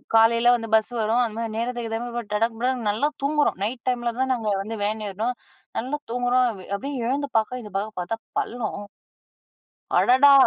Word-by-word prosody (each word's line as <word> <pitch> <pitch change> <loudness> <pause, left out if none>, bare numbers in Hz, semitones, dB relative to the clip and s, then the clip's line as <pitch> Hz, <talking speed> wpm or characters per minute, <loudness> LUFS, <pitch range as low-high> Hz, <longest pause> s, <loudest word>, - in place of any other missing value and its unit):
காலையில 230 +1 +5
வந்து 225 -2 -4
பஸ் 220 +2 +2
வரும் 225 +3 +2
அந்த 225 -3 -3
மாதிரி 230 -1 -3
நேரத்துக்கு 240 0 -2
ஏத்த 225 0 -1
மாதிரி 240 -3 -5
டடக் 225 +2 +1
புடானு 250 -1 0
நல்லா 220 +8 +2 0.2
தூங்குறோம். 295 +1 +2
நைட் 235 +4 -2
டைமில 240 -1 0
தான் 260 0 +2
நாங்க 225 -4 -1
வந்து 220 +3 -5
வேன் 215 +1 -1
ஏறினோம். 220 +6 -2 0.4
நல்லா 270 +5 -3
தூங்குறோம். 245 +1 +3 0.3
அப்டியே 270 +1 -4
எழுந்து 280 +3 0
பாக்க, 245 +3 0
இந்த 210 - -10
பக்கம் 210 +2 -4
பாத்தா 185 +6 -3 0.2
பள்ளம். 215 -3 -4 1.1
அடடா! 265 +3 +7
235 Hz, 170 wpm, -24 LUFS, 220-250 Hz, 1.1 s, அடடா